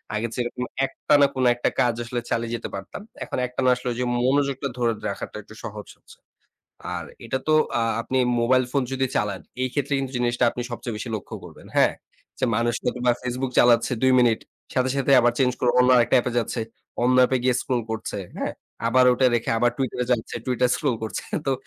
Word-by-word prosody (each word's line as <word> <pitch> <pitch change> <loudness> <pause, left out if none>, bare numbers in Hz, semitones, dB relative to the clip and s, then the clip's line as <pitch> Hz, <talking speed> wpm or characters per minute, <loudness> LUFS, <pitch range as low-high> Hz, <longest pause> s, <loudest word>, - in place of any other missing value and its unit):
আগে 115 +2 -1
যেরকম 125 0 -3 0.2
একটানা 145 +1 +3
কোনো 130 -1 +2
একটা 120 - 0
কাজ 120 -1 +3
আসলে 120 0 -3
চালিয়ে 115 0 -1
যেতে 115 - -5
পারতাম। 95 - -7 0.2
এখন - - -5
একটানা 125 +1 0
আসলে 125 0 -7
ঐ - - -1
যে 125 - 0 0.2
মনোযোগটা 140 0 +1
ধরে 120 -2 +1 0.2
রাখাটা - - -6
একটু - - -14
সহজ - - -7
হচ্ছে। - - -18 0.8
আর 85 -2 -4 0.2
এটা 125 +3 -2
তো 155 - +5 0.3
আ - - +1 0.2
আপনি 130 +3 -1 0.2
মোবাইল 130 +2 +3
ফোন 140 -1 +1
যদি 130 0 +1
চালান 100 -3 -1 0.2
এই 130 - +1
ক্ষেত্রে 145 +1 -1
কিন্তু 135 -1 -3
জিনিসটা 120 0 +1
আপনি 120 - -5
সবচেয়ে 120 -1 -5
বেশি 120 - -5
লক্ষ্য 100 - -8
করবেন। - - -13
হ্যাঁ, - - +4 0.4
যে - - +1
মানুষ 120 0 +1
হয়তবা 125 0 +1
Facebook 125 +1 -3
চালাচ্ছে 120 0 +5
২ 130 0 +5
মিনিট। 115 -2 +3 0.3
সাথে, 130 0 +1
সাথে, 140 0 +2
আবার 120 0 +3
চেঞ্জ 125 -2 +3
করে 125 - +3
অন্য 125 0 +5
আরেকটা 120 +2 +4
অ্যাপে 125 0 -1
যাচ্ছে, 115 +1 -2 0.4
অন্য 125 +1 +3
অ্যাপে 130 +1 +3
গিয়ে 125 -1 +3
স্ক্রল 125 -3 -1
করছে। 110 -2 -4 0.2
হ্যাঁ? - - -2 0.3
আবার 130 +2 +4
ওটা 130 +1 +3
রেখে 115 - 0
আবার 120 +1 +3
Twitter 130 -2 -2
এ - - -12
যাচ্ছে, 115 -2 -2
Twitter 125 0 +2
স্ক্রল 140 -5 0
করছে 110 - -4 0.2
তো 135 - +2
125 Hz, 200 wpm, -24 LUFS, 120-130 Hz, 0.8 s, তো